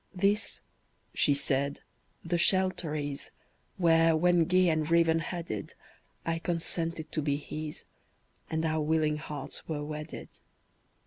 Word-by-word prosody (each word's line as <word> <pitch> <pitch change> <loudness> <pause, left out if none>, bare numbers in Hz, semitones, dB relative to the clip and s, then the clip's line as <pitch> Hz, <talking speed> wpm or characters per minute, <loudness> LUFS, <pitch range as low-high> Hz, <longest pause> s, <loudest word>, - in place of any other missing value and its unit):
"This," 200 +3 +1 0.5
she 145 - +4
said, 140 0 0 0.4
"the 170 +1 0
shelter 185 -4 +2
is, 145 -2 -4 0.5
Where, 165 -2 +5
when 175 0 +4
gay 185 +2 +4
and 155 -1 0
raven 165 -1 +4
headed, 165 - -5 0.5
I 165 0 0
consented 165 -1 -2
to 155 - 0
be 145 -1 +1
his, 150 +1 -6 0.7
And 160 0 -1
our 160 -1 +1
willing 155 0 +2
hearts 150 -2 -7
were 150 -2 -3
wedded. 150 +1 -6
160 Hz, 125 wpm, -30 LUFS, 150-170 Hz, 0.7 s, Where